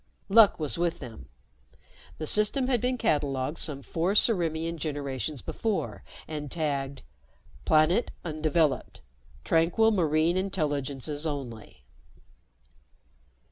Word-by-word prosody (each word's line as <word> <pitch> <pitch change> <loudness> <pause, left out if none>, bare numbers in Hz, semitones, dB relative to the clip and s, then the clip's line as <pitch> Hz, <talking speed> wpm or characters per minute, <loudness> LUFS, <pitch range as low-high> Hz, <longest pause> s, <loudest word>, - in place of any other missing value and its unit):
Luck 210 -3 +6
was 155 +1 -1
with 170 -1 0
them. 115 - -10 0.9
The 155 - -4
system 210 - +2
had 250 -3 +1
been 250 0 0
catalogued 145 - 0
some 140 -3 -3
four 170 +7 -1
Ciriimian 165 -6 +2
generations 145 -2 -3
before 220 -4 -3 0.2
and 150 -2 -5
tagged: 140 -3 -2 0.6
_Planet 160 +8 +4 0.2
undeveloped. 155 -2 0 0.4
Tranquil 170 +7 +3
marine 165 -2 +2
intelligences 150 -5 -2
only. 125 -7 -7
155 Hz, 100 wpm, -28 LUFS, 145-180 Hz, 0.9 s, Luck